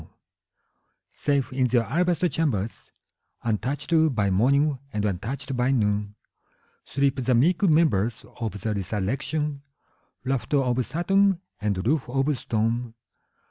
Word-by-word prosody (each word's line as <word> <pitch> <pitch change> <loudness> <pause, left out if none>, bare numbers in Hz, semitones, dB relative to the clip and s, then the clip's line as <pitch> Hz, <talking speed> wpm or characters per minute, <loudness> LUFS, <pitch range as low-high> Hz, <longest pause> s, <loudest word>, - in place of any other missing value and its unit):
IV. - - -15 1.0
Safe 140 -3 -1
in 130 -1 +2
their 120 -1 +2
alabaster 175 - +1
chambers, 120 - -2 0.5
Untouched 130 +8 -2 0.2
by 100 -3 +1
morning 140 +8 +3
and 105 0 -1
untouched 130 +8 -3
by 125 +1 +1
noon, 105 -5 0 0.7
Sleep 140 -1 0
the 125 0 +2
meek 165 - +3
members 130 - +2
of 110 -3 -3
the 110 +2 -1
resurrection, 135 - -2 0.6
Rafter 135 +2 0
of 130 -2 +1
satin, 195 +3 +2 0.2
and 100 -3 -1
roof 140 0 +1
of 135 +3 +1
stone. 115 0 -1
130 Hz, 120 wpm, -25 LUFS, 110-145 Hz, 1.0 s, morning